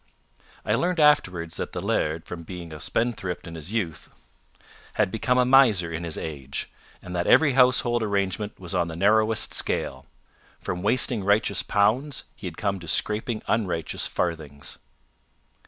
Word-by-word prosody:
I - - +1
learned 180 0 0
afterwards 95 - +3
that - - -4
the - - -3
laird, 80 +1 -1
from 85 - -7
being 85 -1 -8
a 75 - -8
spendthrift 110 -5 -2
in 85 - -8
his 80 +3 -7
youth, 95 -9 -3 0.9
had - - +1
become 125 +3 +1
a 125 - +4
miser 115 -10 +5
in 85 +1 -4
his 80 - -4
age, 70 -3 -4 0.3
and 90 0 -7
that 85 0 -1
every 145 -4 +5
household 125 -2 +4
arrangement 100 -1 -2
was 90 0 -5
on 90 -2 +1
the 80 - -6
narrowest 110 +4 +2
scale. - - -1 0.5
From 90 - -4
wasting 115 +1 +1
righteous 100 0 +2
pounds, 120 +8 +1
he 95 - -7
had 80 - -8
come 100 -3 -1
to 85 - -10
scraping 110 +5 0
unrighteous 90 -8 -1
farthings. 75 -5 -3
100 Hz, 155 wpm, -25 LUFS, 85-115 Hz, 0.9 s, miser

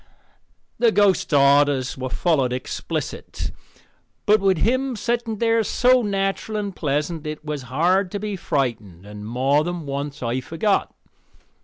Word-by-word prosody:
The 235 -2 +4
ghost's 205 -5 +2
orders 140 -2 +4
were 130 0 -4
followed 135 -3 +1
explicit. 125 0 -4 0.7
But 215 0 +4
with 190 -2 +3
him 260 +6 +1
setting 235 0 -2
there 230 +1 +2
so 250 +4 +3
natural 200 +1 -1
and 200 -3 -3
pleasant 150 +2 -2
it 155 0 -6
was 150 -2 -3
hard 180 +8 +2
to 205 - -2
be 210 0 -3
frightened 115 - -2
and 105 0 -9
more 135 +5 +2
than 175 -1 -4
once 140 0 -4
I 120 +2 -1
forgot. 180 +9 0
160 Hz, 140 wpm, -22 LUFS, 135-205 Hz, 0.7 s, The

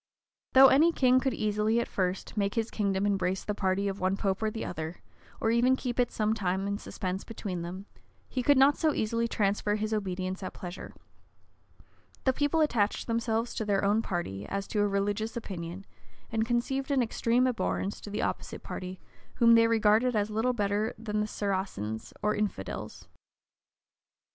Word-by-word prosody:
Though 265 0 +9
any 315 +6 +5
king 255 -4 +4
could 260 -1 -1
easily, 215 +2 +1
at 235 - -1
first, 185 -1 -2
make 200 -1 0
his 225 -1 -1
kingdom 200 -2 0
embrace 190 -2 0
the 210 - -2
party 195 0 0
of 195 0 -3
one 185 +1 +1
pope 195 0 -1
or 220 - +1
the 220 +1 -5
other, 160 +2 -6 0.4
or 225 - +1
even 245 +3 +4
keep 250 -2 -4
it 245 -1 +2
some 215 0 +1
time 190 -2 -1
in 200 0 -2
suspense 185 -2 -4
between 195 -6 -5
them, 180 +3 -6 0.4
he 255 - -2
could 285 +3 +4
not 275 +2 +5
so 315 -2 +1
easily 230 +2 0
transfer 205 -1 0
his 215 +1 -2
obedience 190 -2 -2
at 185 - -6
pleasure: 180 0 -7 1.3
the 260 - +3
people 290 +4 +1
attached 220 -9 +1
themselves 230 0 -1
to - - -2
their 200 -2 +1
own 210 +3 +3
party, 170 - -4
as 200 0 -3
to 210 - -1
a 205 - +3
religious 205 +3 -1
opinion; 185 -3 -6 0.5
and 225 0 0
conceived 265 +3 -1
an 270 -3 +3
extreme 235 +2 +1
abhorrence 225 -5 -1
to - - -8
the 210 - -2
opposite - - -4
party, 185 0 -6 0.4
whom 230 -1 +6
they 230 0 +6
regarded 225 +2 +3
as 210 0 0
little 225 +4 +1
better 205 -1 0
than 210 -1 -2
Saracens, 190 - -3
or 210 - +2
infidels. 210 - -4
210 Hz, 175 wpm, -29 LUFS, 195-230 Hz, 1.3 s, Though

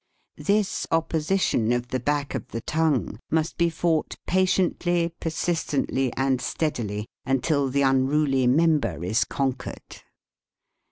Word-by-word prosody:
This 205 0 0
opposition 165 - +1
of 120 0 -1
the 130 - -1
back 145 +2 -1
of - - -4
the 115 - -5
tongue 150 - 0
must 160 0 0
be 170 -1 +2
fought 165 -1 0
patiently, 175 -2 +1
persistently, 160 -5 -1
and 135 -1 +1
steadily 110 -10 -2 0.2
until 135 +2 +1
the 140 +2 +1
unruly 135 0 +2
member 140 - +2
is 110 +6 +2
con 135 -2 -1
quered. - - -10
145 Hz, 120 wpm, -25 LUFS, 130-165 Hz, 0.2 s, be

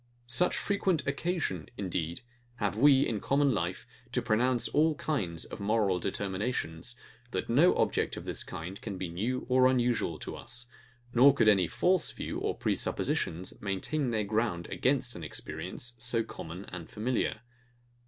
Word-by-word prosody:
Such 125 +9 +2
frequent 190 -6 +1
occasion, 140 - -2
indeed, 85 -1 -3 0.3
have 105 -4 -1
we, 135 +3 +6
in 110 -3 -1
common 140 +4 +2
life, 90 -2 -2 0.3
to - - +2
pronounce 120 +3 +2
all 155 +1 +3
kinds 130 - -2
of - - -8
moral 100 -3 +2
determinations, 100 +1 -3 0.3
that 95 0 -3
no 155 +9 +5
object - - +1
of - - -7
this - - -2
kind 90 +5 -7
can 100 -4 -5
be 90 -2 -3
new 115 +10 -2
or 130 0 +5
unusual 120 -10 +1
to - - -6
us; 120 0 -6 0.5
nor 135 +3 +7
could 110 - +3
any 95 -5 +5
FALSE 180 - +2
views - - -4
or - - -1
prepossessions 90 +3 -1
maintain 105 +9 -1
their 110 -2 0
ground 105 -4 0
against 130 -2 +1
an 85 - -7
experience, 120 +9 -5
so 120 -1 +1
common 90 -3 -8
and 90 -3 -7
familiar. 110 0 -1
115 Hz, 155 wpm, -30 LUFS, 95-130 Hz, 0.5 s, nor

